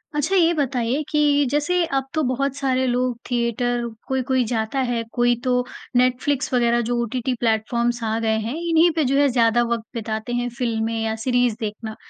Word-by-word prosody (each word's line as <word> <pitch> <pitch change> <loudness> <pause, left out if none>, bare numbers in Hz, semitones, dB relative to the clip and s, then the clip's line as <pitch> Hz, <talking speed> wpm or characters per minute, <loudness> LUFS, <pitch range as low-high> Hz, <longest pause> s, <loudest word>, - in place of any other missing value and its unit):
अच्छा 305 +6 0
ये 345 -2 +4
बताइए 265 -2 0
कि 290 -1 +3
जैसे 320 +5 +1
अब 275 -4 -1
तो 315 - +1
बहुत 270 +1 -1
सारे 260 -2 0
लोग 250 -1 0
थिएटर 240 0 0 0.2
कोई-कोई 260 -1 +1
जाता 225 +3 -2
है, 245 -3 0
कोई 240 -1 +3
तो 250 -1 +1 0.3
नेटफ्लिक्स 255 +2 +1
वग़ैरह 240 -1 +3
जो 245 - 0
ओटीटी 250 +2 -2
प्लेटफॉर्म्स 235 +1 0
आ 220 0 0
गए 220 -1 +1
हैं 235 +5 -3
इन्हीं 330 +1 +5
पे 320 - +2
जो 270 +2 +1
है 285 0 +5
ज़्यादा 240 -1 +3
वक़्त 230 -1 -1
बिताते 220 0 -4
हैं, 245 0 -1
फिल्में 225 -2 -1
या 220 0 -1
सीरीज़ 245 -2 +2
देखना। 220 0 -5
245 Hz, 180 wpm, -22 LUFS, 235-270 Hz, 0.3 s, इन्हीं